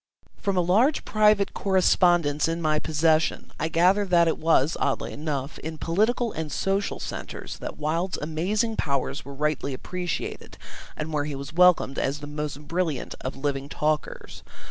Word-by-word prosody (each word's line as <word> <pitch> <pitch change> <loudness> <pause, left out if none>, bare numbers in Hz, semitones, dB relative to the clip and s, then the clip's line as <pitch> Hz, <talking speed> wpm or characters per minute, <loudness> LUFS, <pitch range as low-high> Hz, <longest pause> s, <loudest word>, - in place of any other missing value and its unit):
From 200 -2 -1
a - - +5
large 220 - +2
private 210 -2 +3
correspondence 175 -6 +3
in 165 +1 -1
my 155 -2 +1
possession 160 +1 +1
I - - 0
gather 180 +5 +3
that 175 -3 +4
it 165 - 0
was, 160 -2 +3
oddly - - -1
enough, 145 -2 -4
in 160 0 -6
political 220 +9 +1
and 160 -2 -5
social 195 +5 -1
centres - - -6
that - - -6
Wilde's 165 +5 -1
amazing 190 +9 -1
powers 140 -1 -1
were 140 0 -9
rightly 150 -2 -1
appreciated 180 +5 -5 0.4
and 155 +1 -4
where 145 -1 0
he 145 -1 -4
was 140 +3 -7
welcomed 175 -6 +4
as 140 +2 0
the 150 - -8
most 150 0 -5
brilliant 165 -6 -2
of 130 - -4
living 140 0 -2
talkers. 150 0 -2
160 Hz, 160 wpm, -25 LUFS, 150-180 Hz, 0.4 s, a